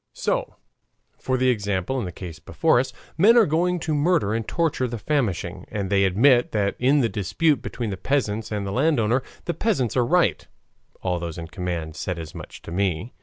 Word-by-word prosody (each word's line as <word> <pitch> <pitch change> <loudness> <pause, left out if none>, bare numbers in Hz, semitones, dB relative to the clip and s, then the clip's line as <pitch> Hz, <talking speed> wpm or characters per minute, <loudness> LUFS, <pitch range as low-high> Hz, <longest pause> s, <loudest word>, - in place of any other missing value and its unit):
So, - - -1 0.6
for 130 0 0
example, 110 -2 0
in 115 - -3
the 90 - -5
case 85 -2 -8
before 120 - +2
us, 130 - -1 0.3
men 225 +7 +7
are 230 - +7
going 175 +3 +1
to 160 -2 -1
murder 150 - +2
and 115 -1 -2
torture 160 -6 0
the 120 0 -4
famishing, 115 - -2
and 100 -2 -3
they 100 -1 +4
admit 120 +6 +4
that 100 -2 +1
in 140 +3 +4
the 120 - +3
dispute 125 - +1
between 115 -4 -4
the 95 - -4
peasants 110 -1 -1
and 105 -1 -2
the 100 - -3
landowner 125 -2 +2 0.2
the 170 - -1
peasants 170 - 0
are 125 - +3
right 175 +8 +2 0.6
(all 90 -2 0
those 85 -1 -5
in 80 -1 -7
command 85 -5 -4
said 90 +3 -3
as 80 -2 -7
much - - -10
to - - -9
me). 95 +4 -1
115 Hz, 195 wpm, -24 LUFS, 95-145 Hz, 0.6 s, men